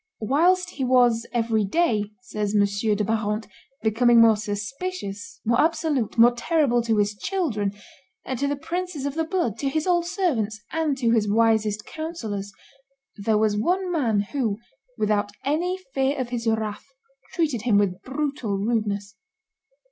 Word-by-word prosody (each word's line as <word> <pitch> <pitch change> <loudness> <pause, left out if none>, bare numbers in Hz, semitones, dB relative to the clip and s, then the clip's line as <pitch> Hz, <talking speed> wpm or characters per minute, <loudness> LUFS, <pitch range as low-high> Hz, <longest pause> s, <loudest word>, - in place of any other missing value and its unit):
"Whilst 355 - +2
he 270 - -4
was 245 -2 +3
every 225 -2 +1
day," 215 - +1 0.2
says 210 -4 -3
M. 205 -1 +5 0.3
de 210 - 0
Barante, 215 0 -1 0.4
"becoming 235 +2 +4
more 225 -1 +7
suspicious, 210 - -5
more 235 +2 +3
absolute, 305 -8 0
more 235 +1 +7
terrible 245 0 +1
to 225 -2 0
his 205 0 +2
children, 230 - -1 0.5
to 265 +2 -1
the 285 - 0
princes 340 -1 -4
of 285 - -2
the 325 +2 0
blood, 320 - -1
to 275 - 0
his 310 +2 -1
old 345 -2 +2
servants, 265 - -1
and 315 -4 0
to 235 -3 +1
his 220 -3 +2
wisest 220 -1 +2
counsellors, 225 - -5 0.6
there 210 +1 +1
was 215 -1 +2
one 360 - 0
man 235 -11 +1
who, 230 -8 -1 0.4
without 210 -1 +1 0.2
any 345 +6 0 0.2
fear 270 +1 +1
of 255 -2 -2
his 240 -1 -3
wrath, 220 0 -1 0.5
treated 300 -9 0
him 225 -3 +3
with 190 -2 +1
brutal 270 -6 -2
rudeness. 205 -2 -1
235 Hz, 150 wpm, -24 LUFS, 210-300 Hz, 0.6 s, more